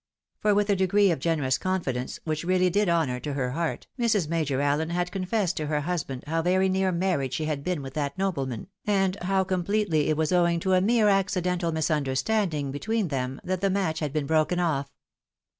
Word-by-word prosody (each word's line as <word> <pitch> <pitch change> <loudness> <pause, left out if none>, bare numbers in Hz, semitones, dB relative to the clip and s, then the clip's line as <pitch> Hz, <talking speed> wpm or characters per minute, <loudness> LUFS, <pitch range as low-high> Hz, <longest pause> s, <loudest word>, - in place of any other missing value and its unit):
— - - -58
for, 210 -1 +3
with 205 0 +2
a - - +3
degree 195 +1 +3
of 165 - -1
generous 145 -4 0
confidence 140 -10 -2
which 155 -1 -2
really 185 0 +2
did 205 0 +2
honour 155 -7 +1
to 145 +2 -4
her 130 -3 -1
heart, 165 +4 -2
Mrs. 215 -8 +2
Major 155 -5 0
Allen 145 +3 +1
had 175 +1 -1
confessed 190 -1 -1
to 155 - -2
her 150 0 0
husband 150 -5 -3
how 165 +2 0
very 185 +3 +2
near 190 0 +1
marriage 170 -8 0
she 155 - -2
had 150 -2 -2
been 175 -4 -2
with 135 -1 -7
that 145 +1 -3
nobleman, 140 - -2 0.2
and 195 -3 +1
how 190 +1 +1
completely 185 -3 0
it 155 - +1
was 160 +1 0
owing 170 -1 +3
to 190 +1 +1
a 185 - +4
mere 220 +2 +3
accidental 180 -3 +1
misunderstanding 155 +1 0
between 215 +7 -1
them 130 -1 -3
that 185 0 -2
the 195 - +2
match 185 -5 0
had 150 -3 -2
been 150 -1 -1
broken 160 +4 +1
off. 145 -5 0
170 Hz, 205 wpm, -26 LUFS, 150-190 Hz, 0.2 s, a